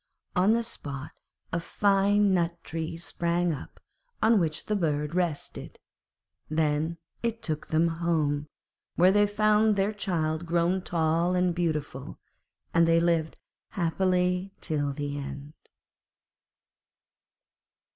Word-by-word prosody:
On 190 +4 +4
the 235 0 +1
spot 145 - -6 0.4
a 170 - +1
fine 200 +2 +3
nut 170 -1 +1
tree 165 0 -4
sprang 170 0 0
up, 140 - -9 0.4
on 220 0 +4
which 160 -3 -1
the 215 - 0
bird 150 -4 -1
rested; 175 -5 -2 0.7
then 155 +1 0 0.2
it 230 -1 -2
took 155 -2 -3
them 160 +2 +2
home, 160 -3 0 0.5
where 180 +2 +5
they 205 +1 +4
found 215 +1 +3
their 200 +2 +1
child 165 -5 -1
grown 175 +2 +1
tall 170 +1 +1
and 180 -1 +2
beautiful, 165 -4 -3 0.6
and 165 0 +4
they 165 0 +5
lived 165 -2 +1 0.4
happily 180 +1 +1
till 145 -3 -1
the 145 0 -4
end. 140 +1 -7
170 Hz, 115 wpm, -28 LUFS, 155-190 Hz, 0.7 s, where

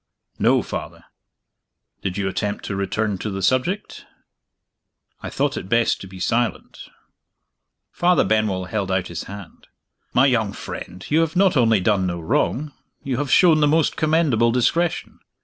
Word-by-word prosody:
"No, - - +3
Father." - - -7 1.0
"Did 95 -1 -3
you 100 -1 -1
attempt 100 +2 -3
to 100 - -3
return 100 +1 -2
to 110 - -4
the 95 -1 -4
subject?" 130 - -1 1.2
"I - - -5
thought - - -1
it 95 - -7
best 115 +1 +2
to 95 - -8
be 95 0 -11
silent." 120 +5 -2 1.0
Father 175 -1 +3
Benwell 105 -4 0
held 100 -1 -3
out 95 -1 -1
his 85 -1 -6
hand. 100 -2 -11 0.4
"My 125 - +4
young 110 -7 +1
friend, 90 -2 -8
you 155 - +4
have 165 +1 0
not 190 -1 +3
only 115 -5 +4
done 95 -1 +1
no 85 -1 -3
wrong 140 - -1 0.3
you 130 -3 -2
have 145 0 -2
shown 165 -4 +5
the 150 - +4
most 155 +1 +2
commendable 155 -8 +2
discretion. 160 +8 0
110 Hz, 155 wpm, -22 LUFS, 95-145 Hz, 1.2 s, shown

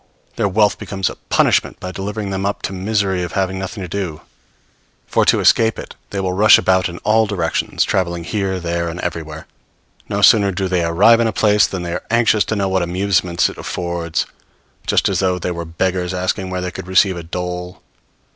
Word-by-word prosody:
Their - - +1
wealth 105 0 +2
becomes 95 -1 -2
a - - -10
punishment - - +2
by 90 - -6
delivering 100 +2 -4
them 95 0 -2
up 100 +1 -2
to 95 - -3
misery 95 -1 0
of 90 -1 -4
having 95 -1 -1
nothing 95 +1 -5
to - - -5
do; 85 -4 -4 0.8
for, - - +1
to - - +4
escape 115 -1 +3
it, - - -8 0.2
they 100 - -4
will 95 -1 -1
rush 105 +3 +7
about 95 -1 +2
in 85 - -8
all 110 +1 +3
directions, 90 -5 -1
traveling 85 -3 -1
here, 95 +1 -2
there 85 0 -2
and 85 +1 -6
everywhere. 80 -2 -5 0.6
No - - -1
sooner 100 -3 +6
do 95 +1 -2
they 90 -2 0
arrive 95 +8 +5
in 115 - +2
a - - 0
place 105 0 +3
than 95 -2 -5
they 85 0 -4
are 90 - -4
anxious 115 -2 +3
to 110 - -2
know 100 -1 0
what 95 0 +1
amusements 90 0 +1
it - - -9
affords; 85 -2 -3 0.6
just - - +2
as - - 0
though 95 -1 +1
they 90 0 -3
were 85 -1 -5
beggars 90 +2 -2
asking 95 +1 -2
where 90 0 -3
they 90 0 -3
could 90 - -8
receive 95 0 +3
a 85 - -5
dole! 90 +2 -5
95 Hz, 205 wpm, -18 LUFS, 90-100 Hz, 0.8 s, rush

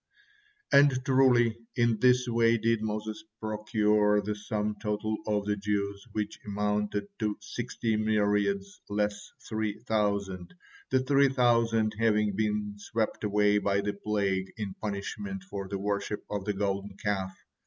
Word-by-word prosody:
And 140 -2 +5
truly 125 -4 +4 0.2
in 120 -2 +2
this 125 +1 +4
way 115 0 +3
did 115 0 +1
Moses 110 0 -3 0.2
procure 105 -1 +2
the 105 +1 -2
sum 105 0 -2
total 105 +1 -1
of 105 -1 0
the 105 0 +1
Jews, 100 -1 -2
which 105 -1 -3
amounted 105 0 -1
to 105 -2 -1
sixty 115 +1 -3
myriads 105 -2 +1
less 105 0 -1 0.2
three 110 -2 -2
thousand, 100 - -1 0.3
the 130 0 +3
three 140 +1 +4
thousand 115 -4 +3
having 105 -3 +2
been 105 -1 -1
swept 110 +1 -2
away 105 0 +3
by 100 -1 +1
the 100 0 -2
plague 100 -2 -1
in 105 -3 -4
punishment 150 - -5
for 100 - -6
their 100 +1 -3
worship 100 +1 -2
of 100 -2 -3
the 105 - 0
Golden 100 0 -2
Calf. 95 -3 -2
105 Hz, 140 wpm, -29 LUFS, 100-115 Hz, 0.3 s, And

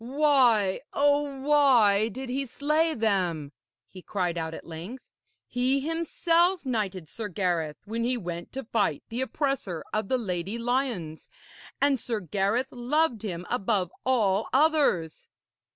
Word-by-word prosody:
'Why, 250 -7 +3
oh 285 -1 +1
why, 250 -8 +4
did 260 +4 -6
he 270 +2 -2
slay 305 +5 +1
them?' 180 -10 0 0.4
he 185 - -12
cried 180 -3 -2
out 160 -1 -3
at - - -10
length. 175 +11 -8 0.4
'He 255 +2 +1
himself 335 +3 +1
knighted 200 -9 -2
Sir 220 +7 -6
Gareth 175 -6 -1
when 225 +2 -3
he 250 +1 0
went 175 -5 -6
to 270 0 -4
fight 215 - 0
the 235 +3 -3
oppressor 260 - -2
of 215 -2 -1
the 260 - +1
Lady 195 -1 -3
Lyones, 235 - -2 0.5
and 280 -2 +3
Sir 225 -1 -3
Gareth 205 - -1
loved 255 0 0
him 180 -5 -5
above 200 -6 0
all 215 -6 +1
others.' 275 - +2
230 Hz, 135 wpm, -27 LUFS, 190-270 Hz, 0.5 s, why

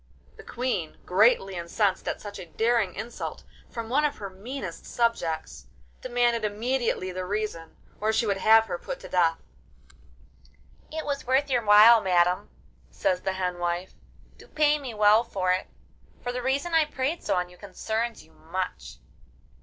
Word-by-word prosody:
The - - -12
Queen, 235 -10 -3
greatly 195 0 +3
incensed 185 +3 -1
at - - -2
such 205 -1 -8
a 180 - -8
daring 225 +1 +1
insult 235 +2 -6 0.3
from 230 -2 -6
one 275 +6 +2
of 295 -1 0
her 200 -2 -7
meanest 200 -2 -7
subjects, 160 - -2 0.3
demanded 240 -2 +1
immediately 220 -2 -1
the 185 0 -4
reason, 200 -4 -4 0.2
or 215 +1 +1
she 220 - +1
would 200 -2 0
have 220 +2 +6
her 175 - -4
put - - -6
to - - -10
death. 165 -2 +2 1.5
'It 315 0 -4
was 280 -3 -3
worth 270 +2 +2
your 245 -2 +2
while, 215 +2 +8
madam,' 180 -1 +2 0.4
says 180 -1 -1
the 190 - -1
hen 180 -1 -2
wife, 175 +1 -2 0.5
'to - - -14
pay 300 -1 +2
me 255 -5 -7
well 210 +2 +5
for 185 -5 -1
it, 185 +1 0 0.6
for 245 - -2
the 250 0 -4
reason 275 +7 -1
I 320 -1 +5
prayed 295 +3 -3
so - - 0
on 180 0 -1
you 180 - -17
concerns 220 +4 -3
you 160 - -23
much. 180 +3 -5
215 Hz, 165 wpm, -26 LUFS, 185-245 Hz, 1.5 s, while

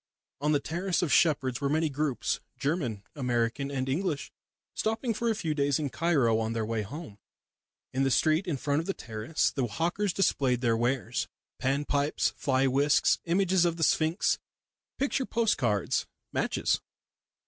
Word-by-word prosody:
On 150 +2 +1
the 145 - +3
terrace 175 +5 -1
of 160 - +1
Shepherd's 135 -5 +3
were 140 - +1
many 160 +2 +2
groups, 145 -2 -1 0.2
German, 135 - -1
American 125 0 0
and 135 -2 -2
English, 150 +1 -1 0.4
stopping 225 +2 -1
for 235 +2 -1
a 225 - +1
few 165 -7 -1
days 140 -2 +1
in 145 -4 -2
Cairo 135 -10 +2
on 110 0 -1
their 115 -1 -1
way 115 0 -1
home. 135 - -8 0.7
In 130 - 0
the 135 - +3
street 155 +7 +2
in 155 -5 -1
front 145 +2 0
of 165 - -4
the 195 - -1
terrace 110 +6 -1
the 130 -4 -1
hawkers 175 - 0
displayed 135 -10 +1
their 115 -3 +2
wares 120 +1 -1 0.3
panpipes, 140 +2 +1
fly 135 -2 +1
whisks, 140 +2 +3
images 185 +1 +3
of 170 -1 +1
the 165 - -1
Sphinx, 160 +3 +2 0.6
picture 275 -1 0
post 230 -2 +1
cards, 105 -7 0 0.3
matches. - - 0
145 Hz, 160 wpm, -29 LUFS, 125-170 Hz, 0.7 s, the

